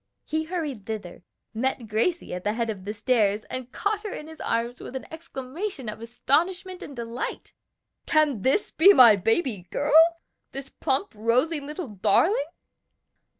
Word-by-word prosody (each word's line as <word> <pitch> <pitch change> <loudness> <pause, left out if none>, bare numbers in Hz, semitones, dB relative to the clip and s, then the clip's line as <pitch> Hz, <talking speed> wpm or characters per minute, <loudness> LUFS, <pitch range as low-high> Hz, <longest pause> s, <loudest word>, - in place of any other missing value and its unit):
He 315 +1 -2
hurried 305 - -4
thither, 210 -7 -6 0.3
met 245 +1 -2
Gracie 230 - 0
at 180 0 -5
the 210 - 0
head 230 0 -1
of 190 -3 -9
the 205 - -3
stairs, 210 -2 +2
and 255 -1 -5
caught 410 0 -1
her 420 -2 -5
in 300 - -6
his 320 0 -12
arms 235 +2 -1
with 260 - -9
an 265 - -5
exclamation 315 - -6
of 215 +1 -6
astonishment 350 +10 -1
and 280 - -8
delight. 235 0 -5 0.5
"Can 300 -8 +2
this 270 - +1
be 385 +6 +7
my 235 - +8
baby 220 - 0
girl? 290 +1 -1 0.6
this 275 0 -6
plump, 270 +10 -2
rosy 245 +9 +1
little 300 +3 -6
darling?" 280 - +2
260 Hz, 155 wpm, -25 LUFS, 220-315 Hz, 0.6 s, my